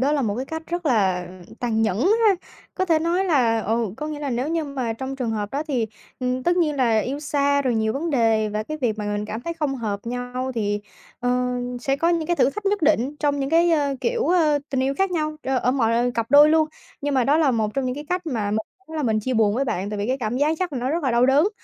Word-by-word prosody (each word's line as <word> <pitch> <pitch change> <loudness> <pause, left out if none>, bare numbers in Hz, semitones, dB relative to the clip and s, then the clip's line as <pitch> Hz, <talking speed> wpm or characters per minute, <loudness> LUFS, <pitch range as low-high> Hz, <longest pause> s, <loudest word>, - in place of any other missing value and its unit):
Đó 280 +3 +2
là 285 -3 +1
một 205 -3 0
cái 255 - -2
cách 320 0 -5
rất 345 -1 -3
là 190 -8 +2 0.3
tàn 225 -2 0
nhẫn 210 -2 0 0.3
ha, 400 - +6 0.4
có 375 - 0
thể 325 -3 +3
nói 345 +4 +1
là 240 -10 +2
ừ, 225 +2 0
có 300 - -4
nghĩa 305 -1 -5
là 280 -2 -3
nếu 250 +5 -1
như 325 -1 -1
mà 260 -5 -3
trong 265 +3 -5
trường 245 -4 -2
hợp 210 -2 -3
đó 285 +2 -1
thì, 240 -6 0 0.3
ừm, 255 0 -1
tất 350 +4 +2
nhiên 305 -5 +1
là 230 -4 +3
yêu 275 +6 -2
xa 285 -1 +1
rồi 250 -3 +1
nhiều 220 0 +1
vấn 320 +5 -2
đề 225 -4 +2
và 210 +1 -2
cái 310 +7 -5
việc 220 -4 0
mà 210 - -3
mình 205 0 -2
cảm 220 +2 -5
thấy 335 +5 -4
không 300 -4 -1
hợp 210 -4 -3
nhau 245 +1 -3
thì, 205 -2 -1 0.4
ờ, 250 0 +1 0.3
sẽ 270 +2 0
có 330 +4 +1
những 335 -2 +1
cái 345 -1 0
thử - - +3
thách 415 +5 -6
nhất 405 -2 +1
định 295 -2 +2
trong 290 -1 0
những 275 - -2
cái, 335 +1 +4
ơ, 285 -3 +2
kiểu, 475 0 0
ơ, 315 -5 +3
tình 265 -1 0
yêu 270 +1 0
khác 385 -1 +2
nhau, 310 -3 -1
ơ, 265 -1 0
ở 250 - +1
mọi 240 -1 +2
cặp 230 -1 -1
đôi 295 +1 +8
luôn. 315 -1 +3 0.3
Nhưng 285 -1 -1
mà 255 -2 +3
đó 290 +3 +3
là 305 -4 +4
một 220 -3 -1
trong 270 -1 0
những 250 - -1
cái 295 +2 -7
cách 360 -1 -2
mà 220 -8 -1
mình 215 - +1 0.3
đúng 320 - -7
là 305 - -1
mình 220 -3 +1
chia 255 +3 -2
buồn 215 -2 +3
với 270 +3 0
bạn, 200 -4 -2
tại 210 - -4
vì 205 - -1
cái 260 +2 0
cảm 235 0 -2
giác 300 +3 +2
chắc 360 -4 -2
là 260 - -2
nó 255 +3 -1
rất 330 0 -1
là 260 - +1
đau 240 +2 +4
đớn, 290 +8 +4
265 Hz, 285 wpm, -23 LUFS, 230-305 Hz, 0.4 s, đôi